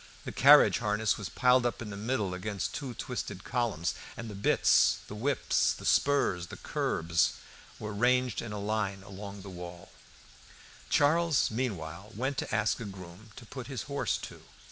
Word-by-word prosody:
The -, -, -4 dB
carriage 145 Hz, +1 st, +7 dB
harness 105 Hz, -1 st, +1 dB
was 105 Hz, -4 st, -6 dB
piled 125 Hz, 0 st, +4 dB
up 120 Hz, -1 st, -1 dB
in 110 Hz, -3 st, -6 dB
the -, -, -6 dB
middle 105 Hz, -2 st, -1 dB
against 100 Hz, +2 st, -3 dB
two 130 Hz, -4 st, -5 dB
twisted 105 Hz, -6 st, -5 dB
columns, 115 Hz, -9 st, -1 dB, 0.2 s
and 115 Hz, -2 st, -6 dB
the -, -, -7 dB
bits, 100 Hz, +1 st, +4 dB
the -, -, -8 dB
whips, 130 Hz, +6 st, +1 dB
the -, -, -10 dB
spurs, 100 Hz, -11 st, +2 dB
the -, -, -9 dB
curbs, 80 Hz, 0 st, 0 dB, 0.4 s
were 105 Hz, -1 st, -5 dB
ranged 125 Hz, +2 st, +2 dB
in 115 Hz, -, -6 dB
a 105 Hz, -, -4 dB
line 100 Hz, -2 st, -2 dB
all 100 Hz, -, -13 dB
along 100 Hz, 0 st, -8 dB
the 100 Hz, -, -8 dB
wall. 90 Hz, -1 st, -9 dB, 1.0 s
Charles, 160 Hz, -1 st, +3 dB
meanwhile, 100 Hz, -5 st, -4 dB
went 135 Hz, +4 st, -1 dB
to -, -, -4 dB
ask 105 Hz, +3 st, +1 dB
a 115 Hz, -, -5 dB
groom 95 Hz, +2 st, -10 dB
to 120 Hz, -, -11 dB
put 125 Hz, +2 st, -8 dB
his 130 Hz, -7 st, -4 dB
horse 140 Hz, 0 st, -1 dB
to. -, -, -9 dB
110 Hz, 175 wpm, -30 LUFS, 95-125 Hz, 1.0 s, carriage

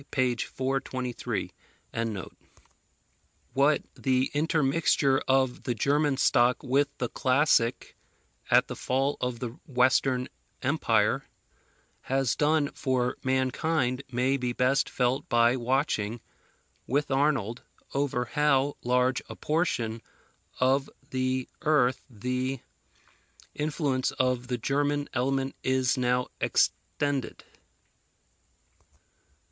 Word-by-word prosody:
p. 130 Hz, -2 st, +1 dB
423.] 130 Hz, 0 st, -3 dB, 2.0 s
What 140 Hz, +3 st, +3 dB
the 130 Hz, -1 st, 0 dB
intermixture 145 Hz, -3 st, +2 dB
of 130 Hz, -1 st, +2 dB
the 120 Hz, -, -2 dB
German 145 Hz, +4 st, +1 dB
stock 120 Hz, -2 st, +3 dB
with 140 Hz, +3 st, +2 dB
the 125 Hz, -, -1 dB
classic, 130 Hz, -3 st, +1 dB, 0.5 s
at -, -, +5 dB
the -, -, -6 dB
fall 135 Hz, +2 st, 0 dB
of 125 Hz, -1 st, -1 dB
the 120 Hz, +1 st, -4 dB, 0.2 s
Western 130 Hz, 0 st, +2 dB, 0.4 s
Empire, -, -, +1 dB, 0.8 s
has 135 Hz, -2 st, 0 dB
done 150 Hz, -1 st, +2 dB
for 125 Hz, -2 st, -1 dB
mankind 130 Hz, +1 st, 0 dB
may 130 Hz, +3 st, +1 dB
be 125 Hz, -2 st, -2 dB
best 130 Hz, +3 st, +2 dB
felt 130 Hz, +3 st, 0 dB
by 120 Hz, 0 st, +4 dB
watching, 120 Hz, -3 st, 0 dB, 0.7 s
with 145 Hz, +3 st, 0 dB
Arnold, 135 Hz, -5 st, +1 dB, 0.3 s
over 135 Hz, -3 st, 0 dB
how 145 Hz, +1 st, +1 dB
large 125 Hz, +1 st, +2 dB
a -, -, -7 dB
portion 120 Hz, -9 st, -1 dB, 0.6 s
of 135 Hz, +2 st, +2 dB, 0.2 s
the 130 Hz, 0 st, -1 dB
earth 145 Hz, -5 st, +2 dB
the 125 Hz, +3 st, -2 dB, 0.9 s
influence 145 Hz, -3 st, -1 dB
of 125 Hz, -1 st, 0 dB
the 125 Hz, -1 st, -1 dB
German 145 Hz, +3 st, 0 dB
element 135 Hz, +1 st, 0 dB
is 130 Hz, -1 st, +1 dB
now 125 Hz, -1 st, +1 dB
extended. 145 Hz, -2 st, -1 dB
130 Hz, 100 wpm, -28 LUFS, 125-140 Hz, 2.0 s, at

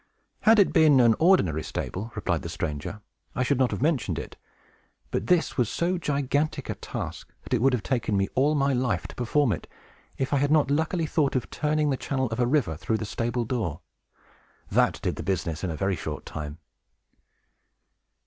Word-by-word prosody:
"Had 220 Hz, +1 st, +5 dB
it 200 Hz, -, +4 dB
been 155 Hz, -5 st, +6 dB
an 120 Hz, -2 st, +6 dB
ordinary 100 Hz, -, +4 dB
stable," 105 Hz, +7 st, -5 dB
replied -, -, -1 dB
the -, -, -6 dB
stranger, 75 Hz, +8 st, -4 dB, 0.3 s
"I 125 Hz, -, +1 dB
should 135 Hz, +1 st, +1 dB
not 130 Hz, -2 st, +3 dB
have -, -, -3 dB
mentioned 125 Hz, -, +1 dB
it. -, -, -6 dB, 0.8 s
But -, -, -2 dB
this 180 Hz, -4 st, +2 dB
was 120 Hz, -4 st, +2 dB
so 175 Hz, +1 st, 0 dB
gigantic 145 Hz, 0 st, -1 dB
a -, -, -1 dB
task -, -, -6 dB
that -, -, -5 dB
it 120 Hz, -, +2 dB
would 135 Hz, +1 st, +4 dB
have 120 Hz, -4 st, 0 dB
taken 115 Hz, -5 st, 0 dB
me 95 Hz, 0 st, +1 dB
all 145 Hz, +4 st, +3 dB
my 140 Hz, -1 st, +2 dB
life 120 Hz, -9 st, 0 dB
to -, -, -9 dB
perform 125 Hz, +2 st, +1 dB
it, 85 Hz, -, -4 dB, 0.5 s
if 135 Hz, +2 st, -1 dB
I -, -, +4 dB
had 140 Hz, +1 st, +2 dB
not 150 Hz, -2 st, +3 dB
luckily 160 Hz, +3 st, +1 dB
thought 150 Hz, -3 st, +1 dB
of 130 Hz, -, -2 dB
turning 150 Hz, -1 st, +1 dB
the 135 Hz, -, 0 dB
channel 130 Hz, -2 st, -1 dB
of 115 Hz, -, -3 dB
a 120 Hz, -, +3 dB
river 125 Hz, -, +1 dB
through 80 Hz, +8 st, -1 dB
the 110 Hz, -, -4 dB
stable 120 Hz, +3 st, -2 dB
door. 105 Hz, -, -2 dB, 0.9 s
That -, -, +2 dB
did -, -, -1 dB
the -, -, -4 dB
business 85 Hz, -2 st, -2 dB
in 95 Hz, -, -1 dB
a 80 Hz, -, -3 dB
very 95 Hz, +2 st, 0 dB
short -, -, -5 dB
time!" 75 Hz, -1 st, -6 dB
125 Hz, 195 wpm, -26 LUFS, 105-150 Hz, 0.9 s, been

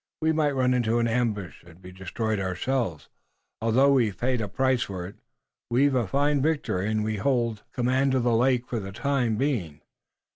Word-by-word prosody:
We 160 Hz, 0 st, +2 dB
might 155 Hz, -2 st, +1 dB
run 130 Hz, -1 st, +2 dB
into 120 Hz, -2 st, +1 dB
an 115 Hz, 0 st, +2 dB
ambush 110 Hz, -8 st, -2 dB
and 85 Hz, 0 st, -17 dB
be 90 Hz, 0 st, -12 dB
destroyed 105 Hz, +3 st, -3 dB
ourselves. 95 Hz, -, -2 dB, 0.5 s
Although 125 Hz, +5 st, +4 dB
we've 115 Hz, -8 st, +2 dB
paid 125 Hz, -1 st, 0 dB
a 105 Hz, -, -2 dB
price 130 Hz, +4 st, +1 dB
for 95 Hz, -3 st, -4 dB
it, 100 Hz, +3 st, -10 dB, 0.5 s
we've 135 Hz, +4 st, +3 dB
a 120 Hz, -5 st, +1 dB
fine 145 Hz, +5 st, +1 dB
victory 140 Hz, -, 0 dB
and 110 Hz, 0 st, 0 dB
we 110 Hz, 0 st, -2 dB
hold 115 Hz, -2 st, 0 dB
command 130 Hz, +2 st, +1 dB
of 130 Hz, -, +1 dB
the 120 Hz, -1 st, +2 dB
lake 125 Hz, +1 st, +2 dB
for 120 Hz, -2 st, -3 dB
the 95 Hz, -1 st, -7 dB
time 125 Hz, -1 st, 0 dB
being. 100 Hz, -, -2 dB
120 Hz, 185 wpm, -26 LUFS, 100-130 Hz, 0.5 s, Although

